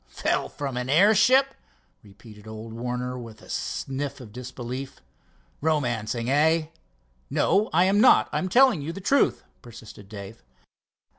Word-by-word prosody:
"Fell 65 - -1
from 135 -3 -5
an 125 +1 -3
airship?" 220 - +4 0.5
repeated 105 +1 -16
old 110 +1 -8
Warner 125 +2 -4
with 115 -3 -10
a - - -16
sniff 135 +1 -4
of 120 -5 -11
disbelief. 125 +1 -7 0.6
"Romancing, 120 -7 -1
hey?" 155 +4 +2 0.6
"No, 210 +3 +2
I 175 +3 +4
am 195 +3 +3
not, 255 - +6
I - - -1
am 185 - -3
telling 250 - +4
you 150 +4 -4
the 170 - -8
truth," 275 +9 +2 0.2
persisted 110 -4 -13
Dave. 100 0 -10
130 Hz, 140 wpm, -25 LUFS, 115-170 Hz, 0.6 s, not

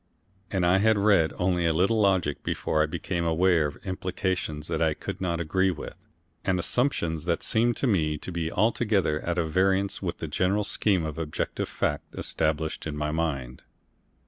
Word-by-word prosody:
And 95 -3 0
I 90 +2 +4
had 110 +1 +4
read 100 -6 +4
only 90 -2 +1
a 80 - +2
little 100 +7 +2
logic 95 -8 +2
before 80 - 0
I 80 - +2
became 85 +2 -3
aware 85 -1 +3
of 75 - -7
implications 90 -4 -2
that 80 -1 -2
I 80 -2 +2
could - - -6
not 85 -3 -1
agree 95 +4 +1
with, 85 -5 -7 0.4
and 95 -2 +1
assumptions 85 - 0
that 85 -1 0
seemed 115 +1 +2
to - - -1
me 80 -10 +1
to 90 - -7
be 85 -1 -2
altogether 105 -8 +1
at 85 +2 -3
variance 95 +4 +1
with 90 -3 -3
the 80 - -5
general 95 +7 +1
scheme 100 -4 +1
of 80 +1 -5
objective 75 -2 -3
fact 75 -1 -2
established 80 0 -2
in 75 -1 -4
my 75 0 -1
mind. 70 -6 -2
85 Hz, 175 wpm, -27 LUFS, 80-95 Hz, 0.4 s, I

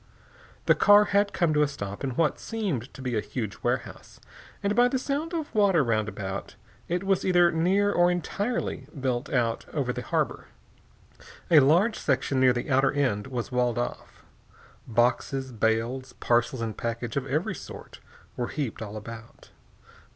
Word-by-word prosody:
The - - +6
car 205 0 +6
had 200 0 +2
come 170 -3 +1
to 150 - +3
a 150 - +4
stop 100 -5 -6
in 130 -3 -2
what 160 0 +1
seemed 185 - -3
to 135 - -9
be 125 -2 -2
a 110 - +1
huge 110 -4 -5
warehouse, - - -3 0.4
and 200 +1 +1
by 245 0 +5
the 260 - 0
sound 285 +5 -2
of 325 -4 -4
water 200 -7 +4
round 110 -3 0
about, 100 -1 -6 0.3
it 175 +2 -1
was 195 -1 +1
either 175 -2 +4
near 190 +5 +2
or 175 -2 +4
entirely 180 - -2
built 130 0 -1
out 115 -3 0
over 135 -5 -1
the - - -4
harbor. - - -2 1.0
A 160 - +9
large 170 - +3
section 130 0 0
near 130 -1 +6
the 120 +3 -3
outer 135 +1 +4
end 125 -8 0
was 125 -2 -4
walled 125 -1 +1
off. 120 - -5 0.6
Boxes, 125 +3 0
bales, 115 +4 -1
parcels 120 +1 0
and 110 -2 -3
packages 115 +1 -4
of 135 -1 -2
every 150 +5 0
sort - - -10 0.4
were 120 - -2
heaped 135 -9 -4
all 110 0 -6
about. 115 +1 -11
135 Hz, 165 wpm, -27 LUFS, 120-175 Hz, 1.0 s, A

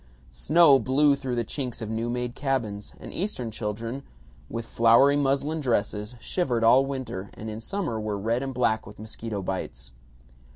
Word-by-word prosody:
Snow 145 - +5
blew 140 +3 +3
through 130 -3 -3
the 120 -1 -1
chinks 125 0 -4
of 110 - -4
new 115 +1 -2
made 125 0 -2
cabins, 120 -8 -2
and - - -9
Eastern 145 - -3
children, 115 +4 -4 0.5
with 115 0 -4
flowery 115 +6 +5
muslin 145 +3 +1
dresses, 110 -3 -1
shivered 125 -6 -1
all 130 +4 +6
winter 115 -8 -5
and 110 0 -6
in 110 +1 -6
summer 165 - -2
were 105 -1 -2
red 115 +5 0
and 135 0 -3
black 110 -4 0
with 105 - -11
mosquito 110 -1 -5
bites. 65 -10 -5
120 Hz, 165 wpm, -26 LUFS, 110-135 Hz, 0.5 s, all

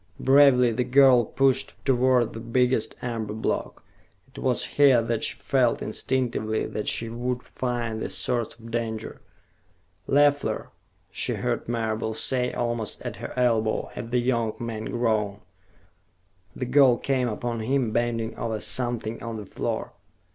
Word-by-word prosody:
Bravely 135 -3 +5
the 120 +3 0
girl 130 -1 +6
pushed 135 +3 +1
toward 130 -2 +3
the 115 - -6
biggest 125 +2 +1
amber 115 -3 -3
block. 110 - -3 0.5
It - - -8
was - - +1
here 140 -4 +5
that 115 -1 -1
she - - 0
felt 125 -3 +1
instinctively 110 -2 -1
that 105 - -4
she 115 - 0
would 125 +2 -3
find 120 -3 -3
the - - -3
source 120 -2 -1
of 115 0 -12
danger. 115 -2 -4 0.9
"Leffler!" 145 0 +2 0.4
she - - -1
heard - - -2
Marable 110 -1 -2
say, 125 +1 0
almost 120 -2 -3
at - - -5
her - - -7
elbow, 115 -3 +1
and 115 - -6
the 125 - +1
young 120 -3 0
man 115 -2 -5
groaned. 105 -4 -1 1.1
The 125 - -3
girl 130 -1 +5
came 130 -1 0
upon 115 +1 -3
him, 125 0 0
bending 115 -1 -1
over 110 -2 -2
something 120 -1 -1
on 115 -1 -5
the 105 - -7
floor. - - -4
120 Hz, 145 wpm, -25 LUFS, 110-125 Hz, 1.1 s, girl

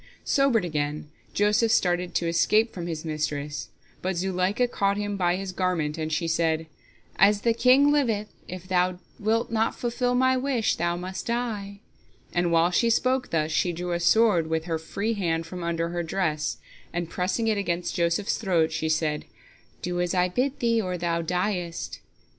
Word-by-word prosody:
Sobered 270 -8 +2
again, 150 -2 -3 0.2
Joseph 210 +2 +2
started 180 -3 +1
to 170 - +1
escape 215 +7 +3
from 175 -2 -5
his 160 -1 -4
mistress, 150 -2 -3 0.3
but 185 -1 -2
Zuleika 190 +6 +1
caught 200 -4 0
him 205 0 -2
by 175 -2 +1
his 190 0 -4
garment, 180 -5 -1
and 160 -1 -3
she 165 +2 0
said: 160 -1 +1 0.5
"As 205 +2 +5
the 230 +1 +3
king 255 +5 +5
liveth, 225 -8 0
if 185 0 -8
thou 180 -1 +1 0.2
wilt 220 +2 0
not 225 0 +1
fulfil 245 +1 0
my 260 +1 +4
wish, 255 -3 +1
thou 170 +1 0
must 185 +1 -6
die," 215 -4 -3 0.5
and 175 -1 +1
while 165 +1 +4
she 230 +6 +3
spoke 255 +2 +1
thus, 155 -1 0
she 175 +3 +1
drew 175 +1 -4
a 170 - 0
sword 175 -1 +4
with 160 0 -1
her 165 -2 -2
free 200 +7 -2
hand 165 -5 -1
from 180 +1 -7
under 170 0 -1
her 175 0 -2
dress, 160 -3 -1 0.3
and, 175 -1 -2
pressing 190 +5 -1
it 215 -2 +2
against 175 -2 -2
Joseph's 170 +4 0
throat, 170 -7 +2
she 160 0 -2
said, 155 -1 0 0.6
"Do 175 0 -1
as 180 +1 -1
I 180 0 +3
bid 255 +8 -1
thee, 230 -1 +3
or 180 -3 -3
thou 170 -1 -1
diest." 180 0 -2
180 Hz, 175 wpm, -26 LUFS, 170-215 Hz, 0.6 s, As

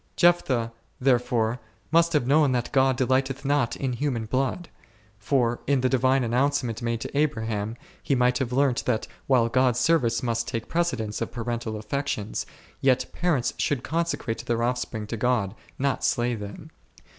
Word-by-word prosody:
Jephthah, 130 -10 +3 0.3
therefore, 120 -2 +1 0.3
must 170 +1 +4
have 150 -5 +2
known 145 0 +4
that 120 -1 -1
God 135 -2 +3
delighteth 130 +2 0
not 140 -4 +1
in 130 -2 -2
human 120 -3 -2
blood; 135 +9 -1 0.5
for 120 +1 +1
in 140 -2 +2
the 130 - +2
divine 130 +1 +3
an 115 - -2
nouncement 125 -3 +1
made 115 -1 -1
to - - -6
Abraham, 110 -7 -1 0.3
he 140 - +1
might 125 0 +2
have 130 -3 -2
learnt 135 -1 +1
that 110 -3 0 0.2
while 125 -4 +4
God's 125 0 +2
sendee 125 -9 +2
must 115 -1 -1
take 115 -3 -4
precedence 125 -11 -1
of - - -2
parental 115 -2 -3
affections, 110 -1 -3 0.3
yet 130 -1 +2
parents 155 -8 0
should 140 -4 0
consecrate 165 -8 -2
their 115 0 0
offspring 120 -3 -2
to 115 +2 -5
God, 115 -4 +1 0.2
not 140 0 0
slay 120 +1 +1
them. 105 -3 -8
125 Hz, 160 wpm, -26 LUFS, 115-135 Hz, 0.5 s, must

